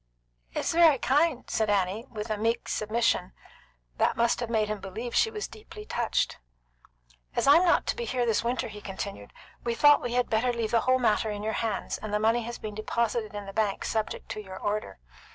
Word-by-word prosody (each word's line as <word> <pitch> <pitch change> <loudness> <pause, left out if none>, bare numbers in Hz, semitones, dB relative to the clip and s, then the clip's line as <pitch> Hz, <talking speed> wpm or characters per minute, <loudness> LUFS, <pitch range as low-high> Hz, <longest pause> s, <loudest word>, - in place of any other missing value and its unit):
"It - - -1
is - - 0
very 330 -4 +6
kind," 285 +2 +1
said 220 -1 0
Annie, 205 +4 0
with 215 0 -5
a - - +1
meek 230 +2 0
submission 215 -4 0 0.6
that - - +2
must 235 0 +2
have 240 -2 -3
made 220 -2 +1
him 210 0 -3
believe 220 +5 -6
she 445 - +4
was 430 -1 -4
deeply 425 0 -11
touched. 240 - -1 1.0
"As - - +1
I'm 290 +6 +7
not 345 - +3
to - - -1
be 475 - -4
here 250 - 0
this 225 -2 +1
winter," 240 +2 -1
he 210 -1 -9
continued, 195 - -6 0.3
"we 235 -1 -1
thought 290 +3 +6
we 240 - -3
had 250 0 +2
better 230 +3 +1
leave 230 -2 -2
the 230 - +4
whole 255 0 +3
matter 220 -2 +2
in 205 0 -4
your 220 +1 -1
hands, 225 -3 -2
and 215 0 -6
the 210 - +2
money 225 +2 +2
has 235 +1 -6
been 215 -1 -6
deposited 215 0 -1
in 205 -1 -5
the 195 - -8
bank 210 -2 0
subject 220 -1 -2
to 215 - -4
your 190 -1 -9
order. 205 - -3
225 Hz, 215 wpm, -28 LUFS, 210-245 Hz, 1.0 s, I'm